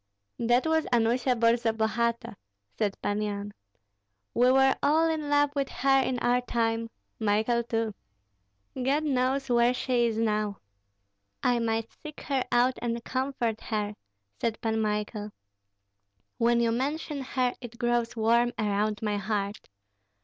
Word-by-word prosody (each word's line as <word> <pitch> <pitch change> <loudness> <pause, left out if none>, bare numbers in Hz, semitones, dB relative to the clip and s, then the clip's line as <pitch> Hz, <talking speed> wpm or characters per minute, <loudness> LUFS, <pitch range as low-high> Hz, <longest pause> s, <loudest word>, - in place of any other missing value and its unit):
"That 240 +3 +2
was 320 0 +1
Anusia 240 +2 +2
Borzabogati," 230 0 +1 0.4
said 205 -2 -1
Pan 205 +1 0
Yan. 205 -1 -4 0.8
"We 250 +1 +4
were 265 0 +4
all 315 +3 +3
in 310 -2 -2
love 290 0 +3
with 275 -1 -1
her 270 0 +3
in 260 -1 -1
our 245 0 +2
time, 230 -1 -1 0.3
Michael 220 +2 +2
too. 225 -2 -2 0.8
God 270 +4 0
knows 270 -1 0
where 240 0 +3
she 245 -2 +1
is 225 -1 -2
now!" 215 -2 0 0.9
"I 245 -1 +3
might 225 -1 -1
seek 305 -2 -11
her 270 -3 -1
out 245 +1 +3
and 235 -1 -2
comfort 255 -4 -2
her," 210 -1 -2 0.5
said 230 -1 -1
Pan 220 -1 -1
Michael. 210 0 -2 1.1
"When 235 0 +3
you 230 -1 +2
mention 285 +4 -2
her 255 -1 0
it 235 -1 -9
grows 240 0 0
warm 235 +2 +2
around 210 0 0
my 210 -1 0
heart. 205 0 -3
235 Hz, 135 wpm, -28 LUFS, 220-255 Hz, 1.1 s, We